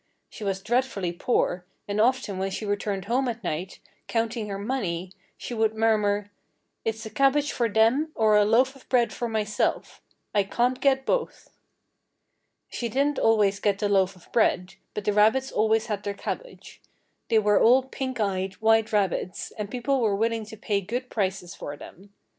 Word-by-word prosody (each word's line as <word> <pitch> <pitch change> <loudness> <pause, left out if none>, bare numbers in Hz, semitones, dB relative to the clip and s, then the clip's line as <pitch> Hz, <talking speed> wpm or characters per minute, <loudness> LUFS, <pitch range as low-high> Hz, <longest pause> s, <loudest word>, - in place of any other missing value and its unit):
She 220 - -9
was 195 -1 -2
dreadfully 225 -5 0
poor, 175 -1 0 0.2
and 205 +1 0
often 225 -5 +1
when 190 +1 -1
she 205 +3 -5
returned 205 -1 -2
home 250 +5 +1
at 230 -2 -4
night, 175 +2 -4 0.3
counting 225 -1 -1
her 195 - -3
money, 195 -6 -3 0.3
she - - -6
would 220 -1 +1
murmur: 210 -2 +1 0.5
"It's 225 0 -3
a 220 - -7
cabbage 280 +1 +2
for 235 -2 0
them 230 +9 +3
or 215 -1 +4
a 210 - +6
loaf 250 +6 +3
of 270 - -19
bread 245 -2 +2
for 240 - -3
myself. 215 -2 -1 0.3
I 205 - +4
can't 245 +6 0
get 265 -1 +2
both." - - -2 1.2
She 235 - -4
didn't 280 +5 +1
always 210 -3 +3
get 205 -2 +1
the 205 0 -1
loaf 190 -1 +2
of 180 - -20
bread, 185 -5 +1 0.2
but 210 - -4
the 210 - +2
rabbits 220 +6 +3
always 220 +1 +2
had 210 -3 -3
their 200 0 -4
cabbage. - - -7 0.5
They 225 - +4
were 210 -1 +4
all 255 +3 +6
pink 260 -1 -5
eyed, 190 -2 -1
white 225 0 +3
rabbits, 195 -3 -1
and 210 -2 -6
people 255 +2 0
were 210 -3 +2
willing 225 +1 0
to 220 - -10
pay 205 -1 -1
good 245 +6 -4
prices 190 -4 -2
for 145 0 -7
them. 195 +7 -13
220 Hz, 175 wpm, -26 LUFS, 200-240 Hz, 1.2 s, a